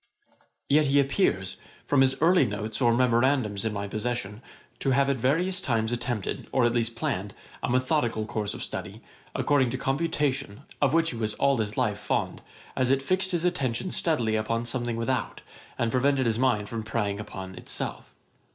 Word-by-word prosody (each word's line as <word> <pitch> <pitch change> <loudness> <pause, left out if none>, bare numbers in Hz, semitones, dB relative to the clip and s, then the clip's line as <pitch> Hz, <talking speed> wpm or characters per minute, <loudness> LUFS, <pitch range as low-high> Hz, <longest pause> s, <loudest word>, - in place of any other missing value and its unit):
] - - -37
Yet 150 +1 +4
he 140 +1 +4
appears, 135 - +1 0.3
from 140 -2 +3
his 135 0 +4
early 175 +3 +5
notes 105 +3 -3
or 120 -2 +5
memorandums 120 -3 +2
in 110 - 0
my 100 -1 -3
possession, 110 0 -3 0.4
to - - 0
have 140 0 +3
at 135 - -1
various 170 - +1
times 115 -6 0
attempted, 120 -4 -3
or 130 -3 +3
at 120 - +2
least 115 -1 0
planned, 100 -3 -3 0.3
a - - -2
methodical 125 -3 +1
course 105 -2 -3
of - - -5
study, - - -5 0.3
according 140 -4 +2
to - - -3
computation, 140 -5 -1 0.2
of 145 -1 +3
which 165 0 +3
he 120 - -6
was 110 -1 -2
all 140 -1 +2
his 105 -2 -2
life - - 0
fond, - - -2 0.3
as 130 -1 +1
it 135 0 +2
fixed 185 +6 +1
his 175 -2 +1
attention 175 -1 0
steadily 120 -10 +1
upon 115 +2 -1
something 120 -1 -2
without, 115 +1 -2 0.4
and 115 -1 0
prevented 130 +1 +2
his 115 0 +1
mind 120 -6 +2
from 115 +1 -4
preying 105 -2 -2
upon 95 -2 -7
itself. - - -4
120 Hz, 180 wpm, -27 LUFS, 110-140 Hz, 0.4 s, early